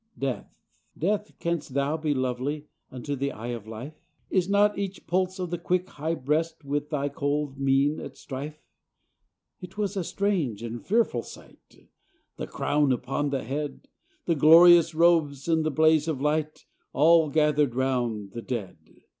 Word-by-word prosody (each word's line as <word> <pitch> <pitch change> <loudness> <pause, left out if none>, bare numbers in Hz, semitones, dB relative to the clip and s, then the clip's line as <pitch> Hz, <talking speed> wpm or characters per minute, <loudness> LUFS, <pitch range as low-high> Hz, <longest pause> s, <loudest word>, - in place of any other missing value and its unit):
Death! 135 -2 -3 0.5
Death! 205 +5 -1
canst 170 -6 -3
thou 140 +2 +1
be 155 -1 -1
lovely 130 +4 -2 0.2
Unto 130 +3 -5
the 140 +1 -2
eye 115 +2 -7
of 110 -3 -8
life? 115 +7 -7 0.4
Is 185 -1 +1
not 205 +1 +4
each 195 -1 -5
pulse 185 +1 0
of 180 -2 -4
the 175 - -2
quick 180 +1 -1
high 160 +3 -3
breast 160 +3 -2
With 145 +1 -2
thy 145 -2 -1
cold 145 0 -2
mien 135 +2 +2
at - - -9
strife? 145 +3 -7 0.5
— - - -54
It 180 +3 -10
was 205 -1 -1
a 190 - -1
strange 165 - -1
and 115 0 -6
fearful 215 - +1
sight, - - -16 0.5
The - - -5
crown 145 -2 +1
upon 135 +3 -1
that 135 -1 -2
head, 145 +4 -5 0.4
The 170 - +2
glorious 165 +2 +7
robes, 160 -5 +3
and 160 -1 +2
the 155 - +1
blaze 155 +1 +3
of 155 -5 -2
light, 150 +2 -1 0.3
All 160 +3 +5
gathered 150 -4 +2
round 120 -6 -1
the 115 - -6
dead! 115 -8 -5
150 Hz, 165 wpm, -26 LUFS, 135-165 Hz, 0.5 s, glorious